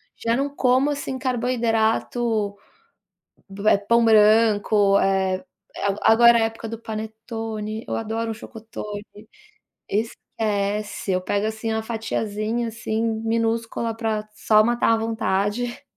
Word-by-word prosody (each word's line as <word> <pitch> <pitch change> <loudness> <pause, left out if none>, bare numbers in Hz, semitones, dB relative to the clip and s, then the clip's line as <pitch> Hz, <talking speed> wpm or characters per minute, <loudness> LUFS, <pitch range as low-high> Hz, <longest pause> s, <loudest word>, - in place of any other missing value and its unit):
já 230 0 0
não 280 +2 0
como, 260 +2 +3
assim, 280 -2 -4
carboidrato, 230 -3 0 1.1
eh, 215 - +6
pão 230 +4 +2
branco, 210 -2 +4
eh, 190 +1 +1 0.3
ago 200 0 -1
agora 235 +1 +6
é - - +2
época 225 0 -3
do 225 0 -6
panetone, 220 0 -5
eu - - -1
adoro 225 +1 -3
um 225 - -3
chocotone. 215 -2 -8 0.9
Esquece, 210 -2 -2
eu 185 0 +1
pego, 205 +3 -1
assim, 220 +1 -3
uma 220 0 -2
fatiazinha, 220 0 -2
assim, 225 0 -3
minúscula 225 0 -1
para 220 -2 -2
só 215 0 +4
matar 235 0 +2
a 225 - +2
vontade. 225 +2 -1
225 Hz, 120 wpm, -23 LUFS, 210-230 Hz, 1.1 s, eh